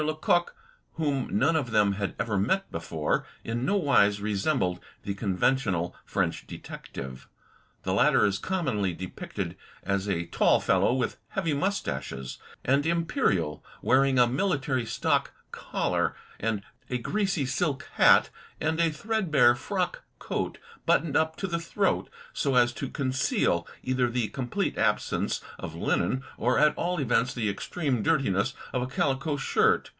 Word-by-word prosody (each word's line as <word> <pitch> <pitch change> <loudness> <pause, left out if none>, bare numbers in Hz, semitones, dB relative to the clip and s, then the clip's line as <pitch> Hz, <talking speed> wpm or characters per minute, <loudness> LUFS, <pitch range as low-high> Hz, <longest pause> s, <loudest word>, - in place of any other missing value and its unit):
Lecoq, 155 +3 +1 0.4
whom 145 -5 -1
none 140 +10 +3
of 145 -6 0
them 105 -3 +3
had 100 0 -3
ever 110 -3 -1
met 190 - +1
before, 80 -2 -1 0.2
in 115 +2 -2
no 200 - +1
wise 120 - +4
resembled 100 -2 0 0.2
the 100 - -2
conventional 100 -2 0
French - - -1
detective. 65 0 -8 0.6
The - - -1
latter - - +4
is 100 -1 +1
com 190 -2 -2
monly 100 - 0
depicted 95 -1 -5 0.3
as 100 +1 -1
a 85 -3 0
tall - - +3
fellow, - - +3
with 130 0 -1
heavy 170 -5 -1
moustaches 140 - -3 0.3
and 140 +2 +3
"imperial," 165 - 0 0.2
wearing 135 +1 +4
a 125 - +7
military 135 - 0
stock - - 0 0.2
collar, - - -1 0.3
a 110 +3 -3
greasy 190 - 0
silk 145 +1 -1
hat, - - +6 0.3
and 160 +1 0
a 165 -1 +4
threadbare 155 - +3
frock 120 - -2 0.2
coat - - -3 0.3
buttoned 145 -1 +2
up 160 0 +2
to - - -4
the 170 -3 -1
throat 190 +3 0 0.2
so 140 -2 0
as 120 -1 +4
to 110 - -4
conceal 130 - 0 0.2
either 130 -1 +1
the 120 -3 -1
complete 125 +2 -2
absence - - 0 0.2
of - - -6
linen 130 +1 0 0.2
or 125 +3 +2
at 150 0 +5
all 175 0 -1
events 125 -2 +1
the 115 -3 -1
extreme 130 - -2
dirtiness 135 -11 +1 0.2
of 125 - 0
a 125 - -2
calico 135 +3 0
shirt. 135 - +2
130 Hz, 145 wpm, -28 LUFS, 105-155 Hz, 0.6 s, a